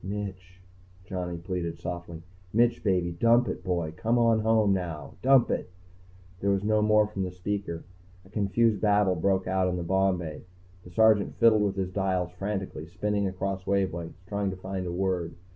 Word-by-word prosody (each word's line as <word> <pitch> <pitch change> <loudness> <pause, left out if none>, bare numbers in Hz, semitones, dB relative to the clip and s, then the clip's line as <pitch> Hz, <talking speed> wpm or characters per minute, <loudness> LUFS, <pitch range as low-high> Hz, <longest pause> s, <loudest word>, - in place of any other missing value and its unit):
"Mitch," 95 -2 -6 0.5
Johnny 90 -2 -4
pleaded 85 -1 -4
softly. 85 -1 -6 0.3
"Mitch, 120 +2 +2
baby. 90 -4 +1
Dump 115 +7 +3
it, - - -4
boy, 85 -4 -1
come 115 +5 +1
on 115 -2 +4
home, 110 -2 +3
now. 80 -6 -4
Dump 135 -1 +5
it." - - -2 0.7
There 100 - 0
was 100 0 +1
no 110 0 +2
more 105 0 +4
from 105 -2 -5
the 95 - -1
speaker. 90 -1 -4 0.4
A - - -17
confused 110 +1 +1
babble 105 -3 +3
broke 95 +2 +1
out 95 0 +1
in 90 0 -1
the 85 - -3
bomb 95 +1 +2
bay. 80 -3 -6 0.4
The - - -12
Sergeant 110 +2 +3
fiddled 115 -2 +5
with 100 -1 0
his 95 -1 -2
dials 95 -2 -1
frantically, 95 -3 -4
spinning 100 +3 -1
across 95 0 -4
wavelengths, 90 -3 -1
trying 100 0 -1
to 95 - -6
find 95 0 -4
a - - -3
word. 90 -2 -1
95 Hz, 175 wpm, -28 LUFS, 90-105 Hz, 0.7 s, Dump